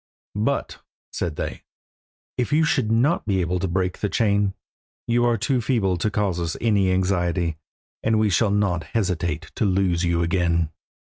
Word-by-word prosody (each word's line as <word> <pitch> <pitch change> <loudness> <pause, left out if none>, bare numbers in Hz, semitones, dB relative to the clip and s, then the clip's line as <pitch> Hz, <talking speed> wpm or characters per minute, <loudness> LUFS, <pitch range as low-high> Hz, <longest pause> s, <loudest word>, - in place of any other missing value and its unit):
"But," 115 +7 -1 0.3
said 85 -4 -2
they, - - -4 0.7
"if 125 - -1
you 155 +2 +4
should 130 -7 +1
not 125 +5 +2
be 95 -2 +1
able 90 0 0
to 95 - -1
break 90 0 -1
the 105 - -1
chain, 100 -3 +1 0.5
you 120 0 +2
are 120 -1 +2
too 125 +3 0
feeble 110 -7 +1
to 105 - 0
cause 100 -4 -1
us 85 -1 -2
any 100 -5 +2
anxiety, 90 -3 0 0.4
and 110 0 +2
we 110 -1 +2
shall 110 +2 +3
not 100 -4 +1
hesitate 90 -6 -2
to - - +1
loose 95 -3 +1
you 85 -1 +1
again." 85 -2 +1
95 Hz, 165 wpm, -23 LUFS, 90-110 Hz, 0.7 s, you